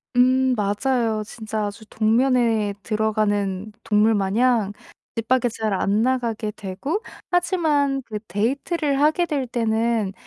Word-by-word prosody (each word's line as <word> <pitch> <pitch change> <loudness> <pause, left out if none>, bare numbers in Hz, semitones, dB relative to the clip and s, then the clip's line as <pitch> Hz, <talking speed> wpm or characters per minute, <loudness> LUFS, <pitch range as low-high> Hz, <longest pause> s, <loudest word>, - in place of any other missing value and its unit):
음 255 +1 +4
맞아요. 220 +1 0
진짜 215 -1 -4
아주 205 +2 -7
동면에 225 -2 +2
들어가는 210 -2 0
동물 220 0 +3
마냥 210 +1 +2 0.4
집 225 -1 -3
밖에 255 -1 +3
잘 220 -2 -2
안 200 +2 +1
나가게 235 -3 0
되고 210 - -4 0.3
하지만 310 -6 +1
그 215 -2 -5
데이트를 275 - 0
하게 310 +4 +3
될 285 -6 -2
때는 225 -3 0
225 Hz, 245 characters per minute, -23 LUFS, 210-260 Hz, 0.4 s, 음